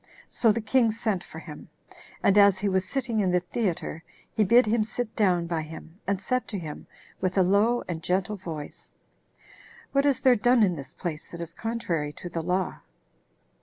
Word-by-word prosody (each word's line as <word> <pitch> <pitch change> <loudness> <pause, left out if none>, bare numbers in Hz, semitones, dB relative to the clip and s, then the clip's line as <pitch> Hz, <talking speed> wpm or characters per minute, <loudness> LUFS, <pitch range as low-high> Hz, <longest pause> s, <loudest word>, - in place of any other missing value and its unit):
So 225 - +3
the 230 +2 -1
king 230 +1 +3
sent 215 -4 -1
for - - -12
him; - - -10 0.5
and 200 - +4
as 200 -2 +6
he 200 +2 -1
was 190 -1 0
sitting 245 -5 -1
in 195 -3 +2
the 180 0 +3
theater, 180 -4 -3 0.3
he 220 - +3
bid 235 +5 +6
him 215 +1 +2
sit 220 +1 -4
down 180 -5 +2
by 165 -1 -1
him, 160 +3 -10
and 200 -1 0
said 255 +6 -1
to 205 - -4
him 155 -5 -7 0.3
with 185 +1 -1
a 190 - +6
low 210 +6 +3
and 165 -2 -4
gentle 185 +5 0
voice, 165 -6 -8 1.0
"What 275 +1 +3
is 275 -2 +2
there 260 -2 +6
done 240 +1 +4
in 180 -4 +2
this 140 -3 -9
place 160 -4 -5
that 170 - -9
is 170 -1 -6
contrary 175 -10 -2
to 175 - -8
the 165 -1 -3
law?" 180 +2 -1
195 Hz, 195 wpm, -27 LUFS, 175-225 Hz, 1.0 s, as